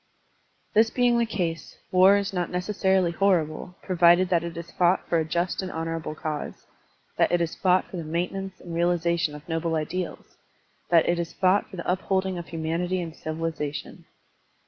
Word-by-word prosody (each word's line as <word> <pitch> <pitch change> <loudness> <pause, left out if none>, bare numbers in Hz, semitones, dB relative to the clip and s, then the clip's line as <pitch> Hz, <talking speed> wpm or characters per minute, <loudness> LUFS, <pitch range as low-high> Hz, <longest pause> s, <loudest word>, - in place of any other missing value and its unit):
This 220 +1 +5
being 245 -1 +2
the 235 - +1
case, 170 -6 -3
war 185 +2 +6
is 200 0 -2
not 175 -2 -1
necessarily 190 -1 +1
horrible, 180 -2 0
provided 175 0 +4
that 170 -2 +2
it 170 0 -6
is 170 0 -7
fought 180 +1 +2
for 170 - +2
a - - +1
just 170 +4 -1
and 185 - -5
honorable 165 -1 -4
cause, 155 -1 -5 0.5
that - - +3
it 175 - +3
is 170 -1 -1
fought 185 -1 +2
for 185 - -5
the 170 - -4
maintenance 180 +4 -3
and 170 - -9
realization 170 -2 +1
of 150 0 -12
noble 165 0 -1
ideals, 170 +3 -4 0.5
that 170 -2 +5
it 175 0 +1
is 170 -1 -4
fought 190 +2 +2
for 205 - -10
the 170 - -6
upholding 190 0 0
of 170 - -8
humanity 170 +3 -2
and 165 -2 -5
civilization. 155 -2 -4
175 Hz, 175 wpm, -26 LUFS, 165-185 Hz, 0.5 s, war